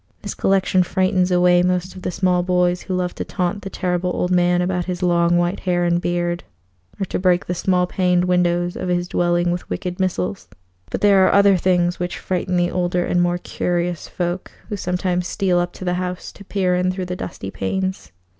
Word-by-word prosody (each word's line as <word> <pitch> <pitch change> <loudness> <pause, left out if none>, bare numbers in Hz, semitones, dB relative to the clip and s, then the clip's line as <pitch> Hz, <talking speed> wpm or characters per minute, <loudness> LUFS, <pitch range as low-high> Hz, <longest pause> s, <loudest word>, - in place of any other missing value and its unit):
This - - -4
collection 190 -1 +2
frightens 185 +1 +1
away 180 0 +4
most 180 +1 0
of 185 - -9
the - - -2
small 180 0 +1
boys 180 0 +1
who 185 - -3
love 180 -1 -1
to - - -4
taunt 185 +2 -2
the 195 - -6
Terrible 180 -1 -1
Old 180 0 -1
Man 175 0 +3
about 180 0 -1
his 180 0 -4
long 175 -1 +3
white 175 +2 0
hair 175 -1 0
and 175 0 +1
beard, 175 0 -1 0.6
or 195 - 0
to - - -3
break 180 -1 +2
the 180 - -2
small 180 0 +1
paned 180 -1 +1
windows 175 -1 +1
of 185 - -4
his 175 0 0
dwelling 175 0 +1
with 175 0 -4
wicked 180 -1 -4
missiles; 100 - -2 0.4
but - - -4
there 195 -2 +5
are - - +3
other 200 -1 +5
things 175 -1 +1
which 180 0 -3
frighten 185 0 -2
the 175 0 +1
older 180 -1 0
and 175 - +1
more 175 0 +1
curious 175 -1 -2
folk 175 +1 -3 0.2
who 210 - -2
sometimes 180 -1 -1
steal 180 -1 +1
up 175 0 -1
to 185 - -8
the 180 - +1
house 180 0 -5
to 200 - -14
peer 185 -2 0
in 180 0 +1
through 185 0 -4
the 180 0 -4
dusty 100 - -6
panes. 190 - -3
180 Hz, 210 wpm, -21 LUFS, 175-185 Hz, 0.6 s, there